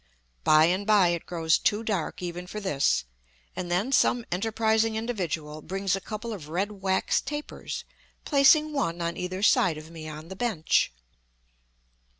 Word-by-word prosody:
By 155 0 +6
and 185 +4 0
by 205 -5 +5
it 170 -1 -2
grows 165 -2 +2
too 210 +2 +1
dark 195 -5 -2
even 175 0 -5
for 210 - -5
this, 145 - +1 0.5
and 180 - -4
then 190 +9 0
some 245 -3 +3
enterprising 220 +3 +1
individual 170 -10 -3
brings 195 +3 -1
a 195 - -5
couple 220 +3 -5
of 155 -8 -8
red 190 +6 -1
wax 190 0 +1
tapers, 295 +1 -6 0.4
placing 300 +2 +5
one 175 - -1
on 170 0 -2
either 185 +2 -4
side 175 -6 +4
of 155 +1 -10
me 160 -2 -8
on 155 +2 -9
the 190 - -7
bench. 200 -8 +1
190 Hz, 155 wpm, -27 LUFS, 170-220 Hz, 0.5 s, By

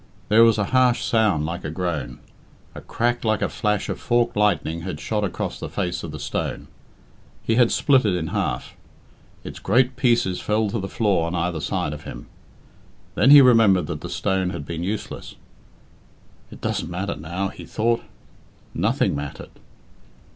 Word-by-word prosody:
There 110 +2 +6
was 115 -1 +5
a 105 - +1
harsh 125 -1 +3
sound 105 -10 +2
like 85 +3 -5
a 80 - -4
groan. 80 -3 -3 0.6
A - - -9
crack 120 +1 -1
like 110 -2 +1
a - - 0
flash 105 -1 -1
of - - -4
forked 120 0 +1
lightning 85 -6 +1
had 85 -4 -5
shot 105 +4 -2
across 95 - -3
the - - -6
face 90 -3 -3
of 85 - -6
the 75 - -7
stone. 70 - -4 0.8
He 115 - 0
had 120 0 +4
split 135 -3 +3
it 100 -4 +1
in 80 -3 -3
half. - - -2 0.7
Its - - -8
great 125 +5 +2
pieces 120 -7 +1
fell 105 -1 0
to 115 - -2
the 95 0 -5
floor 100 -7 +1
on 85 - -3
either 85 -1 -1
side 75 - -2
of 75 - -8
him. - - -8 0.9
Then 135 - +3
he 145 0 +10
remembered 115 -8 +5
that 80 -3 -5
the - - -6
stone 95 -2 -1
had 85 -5 -6
been 85 +1 -5
useless. 100 +4 -5 1.1
"It - - -13
doesn't - - -2
matter 95 +3 -3
now," 85 +6 -3
he - - -11
thought. 115 +1 0 0.7
Nothing - - +1
mattered. 70 0 -7
100 Hz, 175 wpm, -23 LUFS, 85-115 Hz, 1.1 s, he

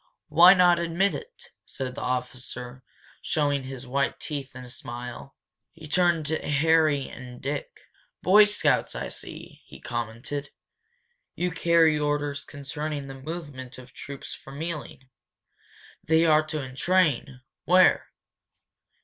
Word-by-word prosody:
Why 170 +5 +8
not 175 -2 +5
admit 170 +4 +1
it?" - - -10
said 130 -2 -5
the - - -7
officer, 125 0 -4 0.4
showing 145 -2 0
his 130 -1 -7
white 140 +2 -1
teeth 140 -4 -5
in 125 - -8
a 125 - -11
smile. 125 0 -7 0.4
He 160 -2 -11
turned 170 -1 +2
to 160 +1 -1
Harry 150 -1 +2
an 125 -1 -10
Dick. 140 +2 -4 0.5
"Boy 205 +3 +7
Scouts, 210 0 +1
I - - -4
see," - - -8
he - - -14
commented. 120 +4 -4 0.9
"You 180 0 -1
carry 165 -2 +3
orders 145 -1 -1
concerning 145 0 -5
the 135 - -8
movement 135 -3 -7
of 125 -1 -13
troops 140 -1 -8
from 140 +3 -8
Ealing? 150 -5 -6 1.0
They 160 +1 +3
are 155 -1 +5
to 155 -2 -3
entrain 135 -1 +1 0.2
where?" 185 +2 +5
145 Hz, 130 wpm, -26 LUFS, 130-165 Hz, 1.0 s, Why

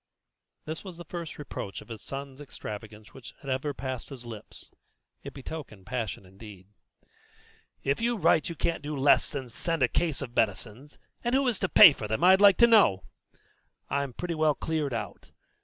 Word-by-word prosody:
(This 160 +1 -6
was 185 -4 -9
the 175 - -9
first 170 -1 -7
reproach 100 -9 -6
of - - -14
his 110 -3 -8
son's 135 0 -7
extravagance 110 -5 -9
which 130 - -12
had 140 - -5
ever 130 +3 -1
passed 130 -2 -6
his 130 -4 -10
lips; 110 -3 -11 0.5
it - - -8
betokened 135 -8 -9
passion 115 -6 -4
indeed.) 95 0 -13 1.2
"If 140 +7 0
you 235 0 +1
write 170 -3 +3
you 170 - -5
can't 165 +2 -1
do 145 0 -5
less 140 +1 +4
than 135 -3 -5
send 165 +5 -2
a - - +5
case 155 0 -1
of 120 -2 -9
medicines, 110 +6 -2 0.3
and 240 +1 +1
who 270 0 +2
is 235 -6 +1
to 190 - -1
pay 160 - +9
for 110 - -6
them, 110 +6 -2
I'd 190 +2 +6
like 200 -2 +7
to 235 - +7
know? 205 - +5 0.9
I'm 140 -1 -1
pretty 175 +6 -4
well 155 -2 +2
cleared 155 -3 -2
out. 115 - -6
140 Hz, 185 wpm, -28 LUFS, 115-165 Hz, 1.2 s, pay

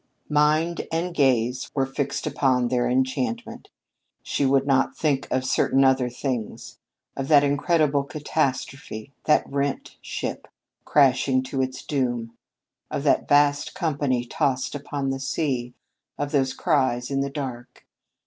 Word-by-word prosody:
Mind 155 +3 +2
and 170 +2 -1
gaze 130 -4 +1
were 135 -2 +2
fixed 135 +1 -3
upon 125 -3 +1
their 120 -1 +1
enchantment. 130 - -2 0.5
She 140 - 0
would 135 0 +3
not 135 -1 +1
think 145 -4 0
of 130 0 0
certain 135 +1 +2
other 130 -2 +3
things 125 -2 -5 0.4
of 135 - -3
that 145 -1 +6
incredible 145 0 +2
catastrophe, 140 -4 -3
that 150 - +3
rent 140 0 -3
ship, - - -5 0.4
crashing 135 -2 +3
to 130 +1 -2
its 130 0 -3
doom, 120 -5 -2 0.5
of - - -3
that - - +2
vast 145 0 +3
company 145 -7 0
tossed 130 +1 -1
upon 140 -1 -3
the 135 - -3
sea, 130 -3 -2 0.4
of 145 0 -3
those 135 -3 +1
cries 130 -6 +1
in 135 0 +1
the 140 - -1
dark. 130 -4 -7
135 Hz, 135 wpm, -24 LUFS, 130-145 Hz, 0.5 s, that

